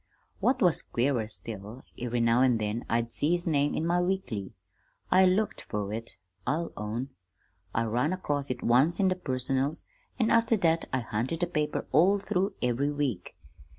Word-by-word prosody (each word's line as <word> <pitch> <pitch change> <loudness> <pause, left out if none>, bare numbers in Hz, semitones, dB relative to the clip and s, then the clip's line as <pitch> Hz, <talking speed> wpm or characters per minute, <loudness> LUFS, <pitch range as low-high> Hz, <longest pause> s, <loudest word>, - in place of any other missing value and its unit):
"What 250 -2 +2
was 175 -5 +3
queerer 120 -3 0
still, 105 +4 -8
every 120 0 -2
now 115 +1 +4
an' 130 -3 +4
then 110 +2 -2
I'd 115 0 0
see 155 +4 +2
his 175 0 +2
name 145 -3 +1
in 160 - -1
my 175 +1 +2
weekly. 175 - -2 0.6
I 185 0 +6
looked 200 +4 +1
fer 105 -1 -4
it, 115 -1 -6 0.3
I'll 165 +4 -1
own. 115 +5 -4 0.7
I 115 - +2
run 120 +8 0
across 145 -6 -2
it 125 - -4
once 135 - +4
in 190 -1 +4
the 185 - +1
'Personals,' 135 -1 -2 0.3
an' 230 -2 +2
after 230 0 +4
that 165 -3 +1
I 130 - 0
hunted 120 +9 -2
the - - +3
paper 150 -3 -2
all 180 +8 +5
through 195 0 -1
every 125 +4 +1
week. 135 -11 -3
140 Hz, 175 wpm, -28 LUFS, 115-175 Hz, 0.7 s, I